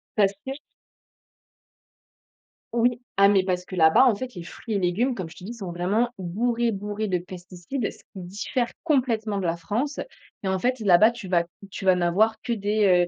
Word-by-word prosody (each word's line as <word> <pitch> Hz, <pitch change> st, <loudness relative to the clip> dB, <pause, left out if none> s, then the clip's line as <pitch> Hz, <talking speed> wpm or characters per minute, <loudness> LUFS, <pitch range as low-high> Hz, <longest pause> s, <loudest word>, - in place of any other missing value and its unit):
Parce 200 Hz, -2 st, +3 dB
que 265 Hz, -, -3 dB, 2.2 s
Oui. 240 Hz, +1 st, +2 dB, 0.2 s
Ah, 200 Hz, 0 st, +6 dB
mais 195 Hz, -2 st, +4 dB
parce 180 Hz, -1 st, -1 dB
que 185 Hz, -, -9 dB
là-bas, 160 Hz, +9 st, +6 dB
en 245 Hz, -, +5 dB
fait, 250 Hz, +4 st, -6 dB
les 175 Hz, -, -7 dB
fruits 215 Hz, +6 st, -6 dB
et -, -, +2 dB
légumes, 195 Hz, +8 st, +1 dB
comme 185 Hz, -7 st, -5 dB
je -, -, -14 dB
t'ai 180 Hz, -, -11 dB
dit, 230 Hz, -, -5 dB
ils -, -, -9 dB
sont 190 Hz, -6 st, -6 dB
vraiment 200 Hz, +8 st, +1 dB
bourrés, 230 Hz, +6 st, 0 dB
bourrés 205 Hz, +2 st, -3 dB
de 180 Hz, -, +1 dB
pesticides. 180 Hz, +6 st, -5 dB
Ce -, -, -16 dB
qui -, -, -22 dB
diffère 205 Hz, +7 st, -2 dB, 0.2 s
complètement 230 Hz, -9 st, +1 dB
de 190 Hz, -, -1 dB
la 165 Hz, 0 st, 0 dB
France 225 Hz, -, -2 dB, 0.4 s
et 195 Hz, -, -2 dB
en 190 Hz, 0 st, +1 dB
fait, 250 Hz, +5 st, 0 dB
là-bas, 210 Hz, +1 st, +6 dB
tu 235 Hz, -5 st, -9 dB
vas 175 Hz, -2 st, +3 dB, 0.3 s
tu 190 Hz, -, -7 dB
vas 185 Hz, -, +7 dB
n'avoir 185 Hz, +6 st, +2 dB
que 240 Hz, -, -2 dB
des, 205 Hz, -4 st, +3 dB
200 Hz, 195 wpm, -25 LUFS, 180-235 Hz, 2.2 s, vas